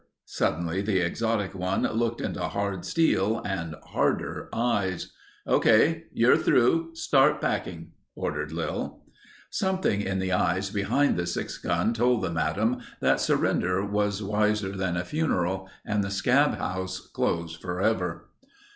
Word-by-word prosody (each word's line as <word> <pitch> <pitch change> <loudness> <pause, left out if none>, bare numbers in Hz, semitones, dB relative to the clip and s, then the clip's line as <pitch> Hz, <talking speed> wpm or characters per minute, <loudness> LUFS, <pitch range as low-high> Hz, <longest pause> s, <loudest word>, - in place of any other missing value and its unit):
Suddenly 85 +3 -1
the 100 -1 0
exotic 100 +3 0
one 95 0 -1
looked 115 +1 0
into - - -3
hard 95 +2 -2
steel 115 - +2
and 85 -5 -3
harder - - -1
eyes. 100 -6 -1 0.3
"Okay. - - +4
You're - - +4
through. 165 +7 +2
Start 145 -2 +3
packing," - - -3 0.2
ordered 75 0 -3
Lil. 80 0 -4 0.5
Something 190 - 0
in 95 -1 -2
the 95 0 -1
eyes 95 +1 +1
behind 105 +7 +1
the 85 0 -1
six 85 - -4
gun 115 - 0
told 120 -1 +2
the 90 - -1
madam 100 +10 0 0.2
that - - +2
surrender 90 +2 +1
was 105 0 -1
wiser 105 -1 +1
than 95 -2 -1
a 90 - -2
funeral 95 - -1 0.2
and 105 -1 0
the 100 - -3
scab 125 +9 +3
house 95 0 -3
closed 85 -1 -1
forever. 90 -1 -1
100 Hz, 135 wpm, -27 LUFS, 90-115 Hz, 0.5 s, Okay